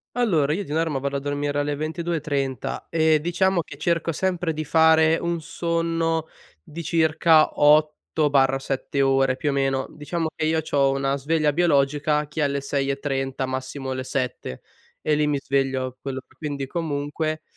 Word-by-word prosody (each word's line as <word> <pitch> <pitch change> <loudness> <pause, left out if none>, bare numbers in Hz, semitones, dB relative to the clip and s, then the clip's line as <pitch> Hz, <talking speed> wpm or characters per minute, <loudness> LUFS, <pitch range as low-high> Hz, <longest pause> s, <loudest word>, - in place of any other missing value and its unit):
Allora, 170 - +2
io 200 +4 -3
di 145 - -8
norma 160 -2 0
vado 140 +1 -3
a - - -5
dormire 145 +1 -2
alle 145 0 -1
22:30 155 -5 -3
e 160 -1 +3
diciamo 175 +3 +1
che 140 - -12
cerco 165 +1 0
sempre 180 0 -1
di 155 0 -4
fare 160 +1 +5
un 170 -1 -2
sonno 165 0 -1 0.4
di 165 +3 -8
circa 160 0 +3
8/7 145 -3 +2
ore 135 -1 +2
più 145 +2 -1
o - - -2
meno. 135 -1 0
Diciamo 160 +2 -3
che 155 - -1
io 160 0 +1
c'ho 140 -3 +2
una 135 0 0
sveglia 150 +2 +1
biologica 150 -2 +2
che 150 +2 -5
è - - +2
alle 140 -1 0
6:30, 135 -1 -2
massimo 130 +1 -4
alle 130 0 -3
7 125 - -4 0.4
e 155 - +1
lì 150 0 +1
mi 145 -1 +1
sveglio 135 -2 -1
quello 135 -1 -4
per 130 - -26
quindi 140 -2 -4
comunque, 155 0 -3
150 Hz, 160 wpm, -23 LUFS, 135-160 Hz, 0.4 s, fare